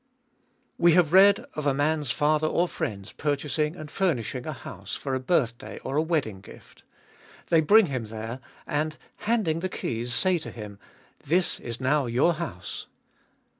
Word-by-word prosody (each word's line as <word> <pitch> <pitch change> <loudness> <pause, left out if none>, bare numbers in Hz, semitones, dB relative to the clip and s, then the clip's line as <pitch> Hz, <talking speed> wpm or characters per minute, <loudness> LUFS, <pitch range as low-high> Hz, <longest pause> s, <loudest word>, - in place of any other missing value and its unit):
We 170 -1 +6
have 170 -2 +4
read 200 +1 +7
of 150 -1 -3
a 135 - +2
man's 150 -1 0
father 150 +4 +2
or 175 +3 +2
friends 100 - -4
purchasing 150 +2 -1
and 155 -4 -9
furnishing 130 - -1
a - - -2
house - - -7
for 135 - -4
a 130 - +1
birth 125 -4 +1
day - - -8
or 135 - -3
a 150 - +4
wedding 145 - -1
gift. - - -15 0.7
They 165 -2 +5
bring 210 +7 +6
him 130 -7 -3
there, 110 +3 -6 0.3
and, 150 +1 -1 0.2
handing 210 -8 0
the 185 +2 -2
keys, 120 -6 -3
say 185 -2 +2
to - - -7
him: 105 -3 -9 0.4
''This 175 +5 +1
is 120 -1 -6
now 135 +1 +2
your 130 +9 +3
house. 115 - -6
150 Hz, 170 wpm, -26 LUFS, 125-170 Hz, 0.7 s, read